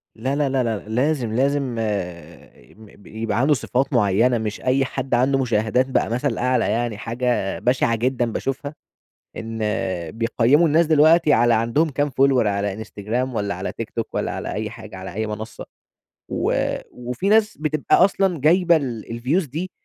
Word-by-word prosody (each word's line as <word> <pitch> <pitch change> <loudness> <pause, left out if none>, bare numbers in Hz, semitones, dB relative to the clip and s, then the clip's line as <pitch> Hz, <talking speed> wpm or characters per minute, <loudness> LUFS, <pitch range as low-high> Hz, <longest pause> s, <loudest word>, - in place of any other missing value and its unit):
لا 130 +5 -2
لا 145 -2 +1
لا 130 -1 +1
لا، 115 -2 -1
لازم 125 0 0
لازم 135 0 0
آآ 90 - -6
م 105 -2 -17
يبقى 110 0 -3
عنده 145 +4 +4
صفات 130 +2 -1
مُعيّنة، 115 +2 +3
مش 110 -1 -4
أي 130 +1 +2
حد 135 0 -4
عنده 130 +3 +3
مشاهدات 120 0 +1
بقى 130 - +1
مثل 125 +1 -1
أعلى، 125 -1 +1
يعني 115 -2 -1
حاجة 120 -3 -2
بشعة 125 -2 +1
جدًا 120 0 0
باشوفها 140 +4 -4 0.6
إن 115 0 -6 0.5
بيقيّموا 120 +7 +2
الناس 160 +2 +3
دلوقتي 155 0 +5
على 120 0 +4
عندهم 115 +9 +1
كام 145 +1 -1
follower 135 -3 +3
على 100 +1 -2
Instagram 115 +6 -3
والّا 100 -1 -1
على - - -5
TikTok - - -4
والّا - - -2
على - - -4
أي 105 0 -3
حاجة، 110 -4 -11
على 95 -1 -8
أي 110 +2 -2
منصة. 110 +1 -6 0.7
و - - 0 0.4
وفي 125 +10 -3
ناس 215 0 +3
بتبقى 155 -1 +1
أصلًا 190 -4 0
جايبة 170 +2 +4
ال 125 -8 -2
الviews 130 +8 -1
دي 175 +7 -4
125 Hz, 165 wpm, -22 LUFS, 110-140 Hz, 0.7 s, دلوقتي